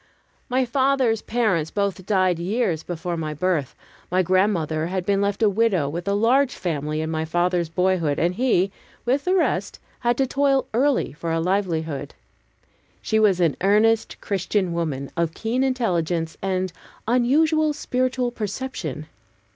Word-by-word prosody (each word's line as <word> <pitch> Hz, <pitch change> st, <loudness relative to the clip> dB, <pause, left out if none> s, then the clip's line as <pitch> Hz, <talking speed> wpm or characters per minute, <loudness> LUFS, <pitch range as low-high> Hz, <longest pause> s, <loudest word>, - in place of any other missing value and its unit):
My 255 Hz, +1 st, +2 dB
father's 260 Hz, -2 st, +2 dB
parents 210 Hz, -10 st, 0 dB
both 195 Hz, -2 st, -2 dB
died 185 Hz, -4 st, +2 dB
years 180 Hz, -3 st, 0 dB
before 175 Hz, +1 st, -4 dB
my 155 Hz, -2 st, -4 dB
birth. 165 Hz, -5 st, -1 dB, 0.3 s
My 185 Hz, +1 st, +2 dB
grandmother 170 Hz, -4 st, +1 dB
had 185 Hz, 0 st, -3 dB
been 200 Hz, 0 st, +2 dB
left 200 Hz, +2 st, 0 dB
a -, -, +6 dB
widow 200 Hz, -7 st, +2 dB
with 170 Hz, +5 st, -5 dB
a 200 Hz, -, +2 dB
large 250 Hz, +6 st, +3 dB
family 155 Hz, -2 st, -2 dB
in 160 Hz, 0 st, -3 dB
my 160 Hz, 0 st, -1 dB
father's 175 Hz, +1 st, 0 dB
boyhood, 175 Hz, -4 st, +1 dB
and 175 Hz, +2 st, +1 dB
he, 195 Hz, -4 st, +2 dB, 0.3 s
with 265 Hz, +4 st, +1 dB
the 365 Hz, +1 st, +2 dB
rest, 370 Hz, -, 0 dB, 0.2 s
had 240 Hz, 0 st, +1 dB
to 270 Hz, -, +2 dB
toil 275 Hz, 0 st, +2 dB
early 270 Hz, -, +1 dB
for 165 Hz, +2 st, -4 dB
a 165 Hz, -, +1 dB
livelihood. 165 Hz, -6 st, -1 dB, 0.9 s
She 220 Hz, -, +1 dB
was 200 Hz, -4 st, +4 dB
an 165 Hz, -5 st, +2 dB
earnest 215 Hz, +3 st, +3 dB
Christian 190 Hz, -2 st, -1 dB
woman, 150 Hz, -5 st, -3 dB
of 165 Hz, -1 st, -1 dB
keen 235 Hz, +4 st, -1 dB
intelligence 175 Hz, -11 st, 0 dB
and 185 Hz, -1 st, -1 dB, 0.3 s
unusual 305 Hz, +6 st, +3 dB
spiritual 255 Hz, -3 st, -1 dB
perception. 205 Hz, -, -5 dB
190 Hz, 150 wpm, -23 LUFS, 165-240 Hz, 0.9 s, a